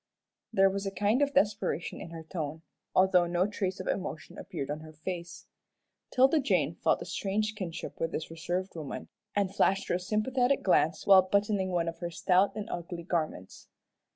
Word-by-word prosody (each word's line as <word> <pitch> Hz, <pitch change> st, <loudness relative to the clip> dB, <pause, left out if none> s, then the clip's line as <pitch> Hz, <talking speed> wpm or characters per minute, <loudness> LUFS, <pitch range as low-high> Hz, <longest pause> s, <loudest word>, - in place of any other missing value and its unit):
There 195 Hz, -3 st, +5 dB
was 195 Hz, +1 st, -3 dB
a -, -, -2 dB
kind 210 Hz, +6 st, +1 dB
of 285 Hz, -1 st, +1 dB
desperation 205 Hz, -, 0 dB
in -, -, -7 dB
her 165 Hz, -1 st, -8 dB
tone, 160 Hz, -1 st, -5 dB, 0.3 s
although 185 Hz, -2 st, +5 dB
no 175 Hz, +1 st, +2 dB
trace 195 Hz, -2 st, -2 dB
of -, -, -5 dB
emotion 180 Hz, -4 st, -4 dB
appeared 140 Hz, +1 st, -5 dB
on 150 Hz, -, -3 dB
her 155 Hz, 0 st, -11 dB
face. 170 Hz, +2 st, -6 dB, 0.7 s
'Tilda 265 Hz, +5 st, +5 dB
Jane 270 Hz, -, +1 dB
felt -, -, +1 dB
a -, -, -10 dB
strange 210 Hz, +2 st, -1 dB
kinship 185 Hz, -6 st, -6 dB
with 165 Hz, 0 st, -1 dB
this 160 Hz, -, -4 dB
reserved 175 Hz, +4 st, -3 dB
woman, 155 Hz, -4 st, -6 dB, 0.3 s
and 200 Hz, -2 st, +1 dB
flashed 195 Hz, 0 st, +2 dB
her -, -, +2 dB
a 175 Hz, -, +1 dB
sympathetic 245 Hz, +7 st, +1 dB
glance 160 Hz, -4 st, +2 dB
while 195 Hz, -1 st, +8 dB
buttoning 200 Hz, 0 st, +1 dB
one 175 Hz, -2 st, 0 dB
of 165 Hz, -, -4 dB
her 175 Hz, -, -3 dB
stout 185 Hz, +4 st, +2 dB
and 215 Hz, -1 st, -4 dB
ugly 175 Hz, 0 st, -5 dB
garments. 155 Hz, -, -3 dB
185 Hz, 180 wpm, -30 LUFS, 170-205 Hz, 0.7 s, while